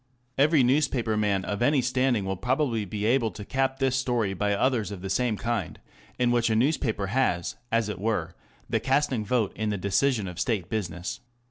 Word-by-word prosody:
Every 145 0 +4
newspaper 125 -4 +1
man 100 -3 +1
of 100 +2 -3
any 140 +3 +3
standing 125 -4 +1
will 95 0 -2
probably 125 0 0
be 105 +2 -4
able 115 0 +2
to 105 -1 -9
cap 135 +2 0
this 135 -1 +1
story 120 -6 0
by 100 +2 0
others 120 -2 +1
of 100 -3 -8
the 95 - -3
same 120 0 +1
kind, 115 -6 -3 0.4
in 125 -1 +2
which 120 -1 +2
a 110 - +2
newspaper 115 -4 +1
has, 90 -10 0 0.2
as 115 -1 +2
it 105 - -5
were, 110 +2 -1 0.3
the 115 -1 0
casting 130 -1 +1
vote 115 -2 0
in 110 -1 -2
the 105 - -1
decision 105 +3 +1
of 90 -2 -7
State 105 -7 -1
business. 90 -2 -3
115 Hz, 195 wpm, -26 LUFS, 100-130 Hz, 0.4 s, Every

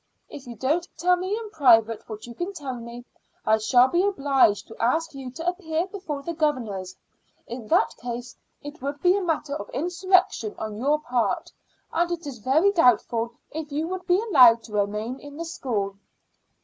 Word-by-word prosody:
If 275 -3 -10
you 240 - -7
don't 305 +10 0
tell 360 +1 +3
me 370 +4 -2
in 445 -2 -7
private 230 - +3
what 215 -1 -7
you 240 - -9
can 350 +9 -4
tell 285 -7 -5
me, 240 0 -9 0.4
I 220 0 +3
shall 245 +3 +5
be 345 +6 +1
obliged 275 - +2
to 225 - -12
ask 320 +8 +1
you 270 -2 -7
to 325 +7 -7
appear 345 -2 -1
before 365 -8 -6
the 335 - -4
governors. 235 - -2 0.5
In 235 -2 -8
that - - +2
case 240 0 -6 0.3
it 290 +2 -9
would 285 +2 -4
be 360 +1 +5
a 400 - 0
matter 310 -5 -1
of 205 - -6
insurrection 355 - +1
on 215 -1 -5
your 290 +5 +2
part, 245 -7 -1 0.4
and 345 +1 +1
it 340 -2 -4
is 270 -5 -7
very 305 - +3
doubtful 235 - +2 0.2
if 310 -1 -6
you 305 +3 -1
would 370 0 -5
be 360 +1 +4
allowed 255 - +6
to 220 - -12
remain 210 +5 -1
in 290 0 -11
the 335 - -4
school." 220 - -3
280 Hz, 190 wpm, -25 LUFS, 235-340 Hz, 0.5 s, allowed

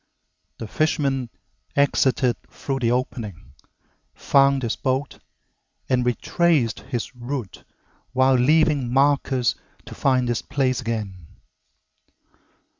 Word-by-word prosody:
The 115 - -6
fisherman 135 -3 0 0.5
exited 130 -3 +2
through 135 -1 -4
the 120 -2 +1
opening, 110 - -3 0.6
found 140 -1 +3
his 115 - -1
boat, 130 +2 -2 0.7
and 125 -1 +1
retraced 125 0 +1
his 125 -1 -5
route 120 -3 -6 0.5
while 130 +1 +3
leaving 145 0 +3
markers 135 -2 +2 0.3
to - - -9
find 130 -2 +1
this 120 -1 -1
place 130 -2 -1
again. 105 -8 -5
130 Hz, 100 wpm, -23 LUFS, 120-140 Hz, 0.7 s, found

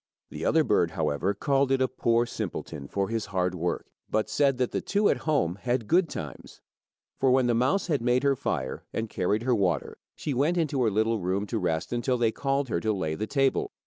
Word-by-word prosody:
The - - -6
other - - +4
bird, - - +2
however, 85 +8 -1
called 135 +5 +1
it 135 - +3
a 130 - +3
poor 120 -2 +1
simpleton 75 -10 -5
for 100 +5 -2
his 110 -2 -2
hard 90 -2 0
work, 85 -1 -2 0.2
but 110 - 0
said 140 -3 +2
that 125 -1 0
the - - -1
two 205 +1 +2
at - - +2
home 95 - +1
had 120 -3 -1
good 175 0 +3
times. 75 -5 -8 0.6
For 135 - +3
when 130 0 +4
the 120 - +2
mouse 130 +11 +2
had 150 -8 0
made 125 +2 +2
her 140 -1 +3
fire 65 - -3
and 110 -1 -3
carried 105 +5 0
her 125 0 +2
water, 90 - 0 0.2
she 145 - -3
went 150 +7 +1
into 150 -5 0
her 115 - +3
little 110 +2 +1
room 95 +2 -1
to 110 +1 -2
rest 80 +5 -1
until 125 +1 0
they 115 -2 +2
called 135 +3 -1
her 85 - 0
to 110 +4 0
lay 90 -7 -1
the 105 +7 -3
table. 135 0 +1
115 Hz, 220 wpm, -27 LUFS, 95-135 Hz, 0.6 s, other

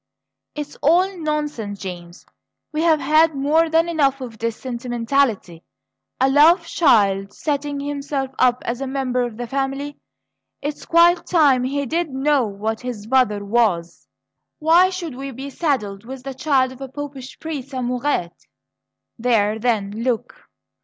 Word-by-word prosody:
"It's 295 -1 -6
all 360 +6 +3
nonsense, 300 - -3
James; 175 -2 -8 0.5
we've 310 +2 -1
had 310 +3 +3
more 305 +4 +2
than 325 +1 +3
enough 280 -5 +1
of 235 -4 -8
this 230 0 -2
sentimentality! 240 -6 -1 0.6
A 260 - +4
love 315 +6 +5
child 205 - +2
setting 290 -1 -2
himself 280 -1 -3
up 250 -1 +3
as 240 +3 -3
a 270 - -2
member 260 -2 -1
of 240 -3 -3
the 245 - -4
family 275 +3 -3 0.6
it's 290 +1 -5
quite 340 +1 +4
time 285 -8 +4
he 280 +2 -1
did 330 +4 -1
know 270 -2 +1
what 215 +2 -4
his 245 -5 -6
mother 225 -5 +2
was! 200 -6 0 0.5
Why 335 +4 +5
should 355 -5 -5
we 270 +2 -6
be 270 +2 -7
saddled 215 - -1
with 260 +2 -9
the 270 0 -5
child 265 -2 +1
of 260 +1 -13
a 270 - -5
Popish 275 -2 -8
priest's 290 -4 -6
amourettes? 250 -7 -2 0.7
There, 220 -3 +2
then 215 -4 0
look!" 245 -3 -3
270 Hz, 145 wpm, -21 LUFS, 235-295 Hz, 0.7 s, love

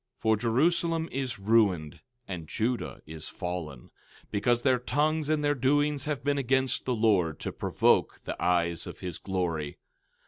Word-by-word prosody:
13:8 - - -33
For 110 0 +3
Jerusalem 160 +8 +1
is 130 -2 -2
ruined, 95 -7 +2 0.3
and 85 -4 -6
Judah 115 +8 -2
is 80 0 -7
fallen, 85 -8 -6 0.4
because 120 +3 +1
their 130 -2 +3
tongues 150 +4 0
and 155 -1 +1
their 145 0 +3
doings 145 +2 +1
have 145 -2 -2
been 145 0 +1
against 130 0 +1
the 125 - 0
Lord, 95 -9 +2
to - - -3
provoke - - +1
the - - -5
eyes 85 -2 +1
of - - -9
his 90 -3 -5
glory. 85 -6 -2
115 Hz, 160 wpm, -28 LUFS, 90-140 Hz, 0.4 s, For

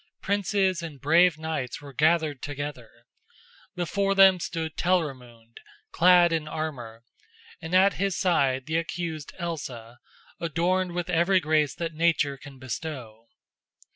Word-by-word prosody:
Princes 195 -2 0
and 160 -5 -8
brave 165 +4 +4
knights 155 -5 -4
were 140 -1 -12
gathered 155 -1 +1
together. 145 -4 -6 0.9
Before 195 +3 0
them 190 -1 +7
stood 160 -2 -4
Telramund, 125 -10 -2 0.3
clad 175 -1 +5
in 160 -2 -1
armor, 135 -8 -6 0.6
and 165 +3 -3
at 195 +2 +5
his 195 -2 0
side 135 -8 +1
the 160 +1 -1
accused 165 -2 -4
Elsa, 125 -9 -6 0.4
adorned 175 +2 0
with 175 0 -3
every 175 +3 +3
grace 155 -3 +1
that 165 -1 -4
Nature 155 -3 +1
can 135 0 -13
bestow. 125 -4 -7
160 Hz, 125 wpm, -26 LUFS, 140-175 Hz, 0.9 s, them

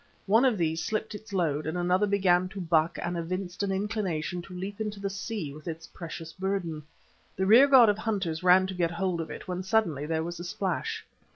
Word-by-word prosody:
One 225 +6 +4
of 245 -5 +3
these 160 -1 0
slipped 220 0 -2
its 210 0 -10
load 155 -6 0
and 160 +3 -2
another 180 +3 +2
began 185 -2 +3
to 195 - -8
buck 165 -2 +1
and 175 0 -2
evinced 180 +2 -4
an 200 -1 0
inclination 190 -4 -2
to 180 - -12
leap 200 +4 -5
into 210 -1 -3
the 195 0 -3
sea 195 -7 -4
with 155 +2 -12
its 165 -1 -5
precious 165 -1 -8
burden. 190 -5 -2 0.5
The 190 - 0
rearguard 250 +3 +8
of 210 0 +2
hunters 195 -8 -2
ran 185 +1 +6
to 190 - -4
get 175 -2 0
hold 170 0 -1
of 160 - -6
it, - - -8
when 180 0 -3
suddenly 185 -8 0
there 160 0 0
was 175 +1 -5
a - - -5
splash. 180 0 -3
185 Hz, 210 wpm, -28 LUFS, 165-200 Hz, 0.5 s, rearguard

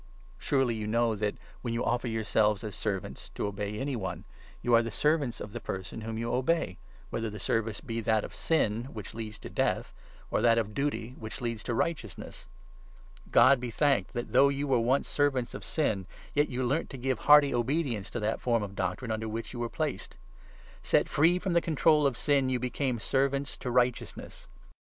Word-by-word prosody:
Surely 135 -4 +1
you 110 -1 -4
know 115 +1 +2
that, 105 0 -1 0.3
when 115 -2 -2
you 115 - -1
offer 120 0 0
yourselves 110 -2 +1
as 105 -2 -5
servants, 100 -1 -3
16 - - -14
to - - -2
obey 100 +1 -4
any 135 +3 -2
one, 100 -5 -4 0.4
you 120 - +2
are 115 - +7
the 115 - -3
servants 145 0 +1
of 105 - -7
the 120 - -4
person 95 +1 -5
whom 110 0 -4
you 115 +1 -2
obey, 130 - 0 0.3
whether 115 -1 -2
the 105 0 -8
service 110 +1 -1
be 115 -1 -3
that 110 -1 +2
of - - -7
Sin 120 -8 +1
which 110 -6 -8
leads 110 -2 -6
to - - -9
Death, - - -1 0.4
or - - +1
that 115 0 +5
of 105 -2 -1
Duty 140 -3 -2
which 110 -1 -6
leads 115 -3 -3
to 120 - -1
Righteousness. 115 - -3 0.8
God 140 - +6
be 125 0 -4
thanked 140 +4 +1
17 120 -1 -4
that, - - -14
though 140 - +6
you 140 +1 -1
were 135 -4 +3
once 125 +4 +2
servants 135 -4 0
of - - -7
Sin, 105 - -1 0.3
yet 145 +1 +2
you 130 +1 -2
learnt 140 +7 0
to 135 - -7
give 130 -2 -1
hearty 145 +1 +6
obedience 120 -4 0
to 120 - -4
that 110 +1 -1
form 115 -3 +1
of 100 -1 -6
doctrine 95 +5 -2
under 110 0 -2
which 115 +3 -5
you 120 - -6
were 120 -1 -2
placed. - - -3 0.7
Set - - +2
free 165 +5 +4
from 185 -1 -2
the 170 - +4
control 155 -2 +3
of 130 -4 -2
Sin, 140 -3 +2
you 130 - +1
became 125 +1 -1
18 - - -6
servants 140 +2 0
to 125 - -4
Righteousness. 125 0 -1
120 Hz, 205 wpm, -29 LUFS, 110-135 Hz, 0.8 s, are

